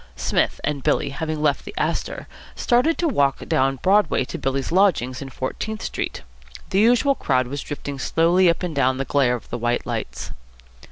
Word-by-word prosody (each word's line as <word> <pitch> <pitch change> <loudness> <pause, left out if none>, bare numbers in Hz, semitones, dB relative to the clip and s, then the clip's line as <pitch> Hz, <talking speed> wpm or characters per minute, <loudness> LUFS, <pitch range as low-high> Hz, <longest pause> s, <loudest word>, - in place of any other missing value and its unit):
Psmith - - 0
and 145 -2 -1
Billy, 140 +2 +1
having 155 +2 -3
left 145 -2 +1
the - - -9
Astor, - - -2 0.3
started 250 +7 +2
to 345 - +1
walk 140 - +1
down 135 +1 +2
Broadway 200 -8 +3
to - - -6
Billy's 135 +1 -2
lodgings 170 -10 +2
in 135 - -6
Fourteenth 215 +12 -4
Street. - - -4 0.5
The 190 - +2
usual 240 +5 +4
crowd 130 - +1
was 140 +3 -5
drifting 145 -1 -6
slowly 170 +5 +3
up 170 - 0
and 170 -4 -3
down 130 -1 +2
in - - -7
the 135 - -2
glare 135 -4 +2
of 120 - -10
the - - -3
white 120 +1 0
lights. - - -4
145 Hz, 185 wpm, -22 LUFS, 135-190 Hz, 0.5 s, usual